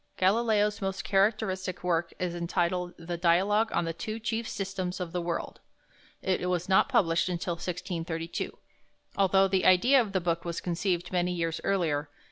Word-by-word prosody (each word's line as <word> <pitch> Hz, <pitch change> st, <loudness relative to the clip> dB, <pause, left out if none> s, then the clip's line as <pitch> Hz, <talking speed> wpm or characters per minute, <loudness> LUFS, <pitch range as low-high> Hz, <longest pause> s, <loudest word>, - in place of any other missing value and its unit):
Galileo's 210 Hz, +1 st, +2 dB
most 195 Hz, 0 st, -2 dB
characteristic 195 Hz, -2 st, 0 dB
work 170 Hz, -1 st, 0 dB
is 180 Hz, -2 st, -2 dB
entitled 175 Hz, +1 st, -1 dB
the 170 Hz, +1 st, -5 dB
"Dialogue 195 Hz, +6 st, +3 dB
on 170 Hz, -, 0 dB
the 165 Hz, -, -2 dB
Two 215 Hz, +6 st, -5 dB
Chief 225 Hz, 0 st, -3 dB
Systems 190 Hz, -2 st, -3 dB
of 180 Hz, -2 st, -4 dB
the 180 Hz, -, -2 dB
World." 170 Hz, 0 st, -4 dB, 0.6 s
It 180 Hz, -1 st, 0 dB
was 180 Hz, -1 st, -1 dB
not 190 Hz, +7 st, +4 dB
published 185 Hz, -9 st, +2 dB
until 175 Hz, 0 st, -2 dB
1632, 170 Hz, -1 st, -4 dB, 0.6 s
although 195 Hz, 0 st, +4 dB
the 190 Hz, -1 st, +1 dB
idea 245 Hz, +9 st, +6 dB
of 210 Hz, -4 st, -4 dB
the 190 Hz, -, +2 dB
book 170 Hz, -1 st, -1 dB
was 170 Hz, -1 st, -3 dB
conceived 175 Hz, 0 st, -1 dB
many 180 Hz, -1 st, +1 dB
years 165 Hz, -2 st, -2 dB
earlier. 160 Hz, -7 st, 0 dB
180 Hz, 160 wpm, -29 LUFS, 170-195 Hz, 0.6 s, idea